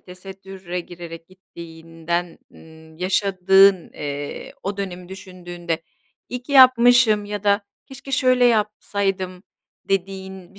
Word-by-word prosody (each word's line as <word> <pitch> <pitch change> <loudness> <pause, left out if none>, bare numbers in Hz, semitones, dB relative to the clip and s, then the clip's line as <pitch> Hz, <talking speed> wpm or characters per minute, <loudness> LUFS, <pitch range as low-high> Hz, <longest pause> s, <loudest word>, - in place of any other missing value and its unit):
tesettüre 190 -1 -8
girerek 170 -1 -10
gittiğinden, 170 -1 -6
ııı, 160 0 -17
yaşadığın, 190 0 +3
eee, 145 0 -6
o 200 +1 -4
dönemi 180 -3 -6
düşündüğünde, 175 -3 -6 0.5
"İyi 250 0 -5
ki 280 - -8
yapmışım 245 -5 +6
ya 205 0 -6
da 200 0 +3 0.3
keşke 270 +1 -11
şöyle 255 -1 +3
yapsaydım." 200 -4 -1 0.5
dediğin 190 -1 -4
bir - - -16
190 Hz, 110 wpm, -21 LUFS, 175-205 Hz, 0.5 s, yapmışım